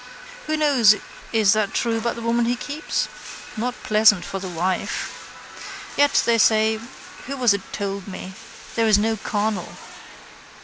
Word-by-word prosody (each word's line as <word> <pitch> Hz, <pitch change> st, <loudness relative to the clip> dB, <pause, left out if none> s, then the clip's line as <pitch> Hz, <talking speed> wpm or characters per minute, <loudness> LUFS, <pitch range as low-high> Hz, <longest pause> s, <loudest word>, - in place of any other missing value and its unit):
Who 310 Hz, 0 st, 0 dB
knows 265 Hz, -8 st, +5 dB, 0.4 s
is 215 Hz, -3 st, +4 dB
that 215 Hz, -2 st, -1 dB
true 230 Hz, -1 st, 0 dB
about 235 Hz, +1 st, -2 dB
the 235 Hz, -, -7 dB
woman 235 Hz, +1 st, +1 dB
he 240 Hz, +1 st, +1 dB
keeps? 295 Hz, +4 st, -3 dB, 0.5 s
Not 245 Hz, +3 st, -2 dB
pleasant 215 Hz, -3 st, +4 dB
for 195 Hz, -, -5 dB
the 185 Hz, -1 st, -6 dB
wife. 180 Hz, +2 st, -5 dB
Yet 285 Hz, 0 st, +4 dB
they 230 Hz, -1 st, +3 dB
say, 220 Hz, 0 st, +3 dB, 0.5 s
who 275 Hz, +1 st, -4 dB
was 245 Hz, -5 st, +4 dB
it 200 Hz, -, -2 dB
told 200 Hz, -1 st, -4 dB
me, 190 Hz, -1 st, -7 dB, 0.4 s
there 230 Hz, -1 st, +1 dB
is 215 Hz, -2 st, +5 dB
no 220 Hz, +2 st, +1 dB
carnal. 210 Hz, -2 st, -3 dB
220 Hz, 150 wpm, -22 LUFS, 205-235 Hz, 0.5 s, knows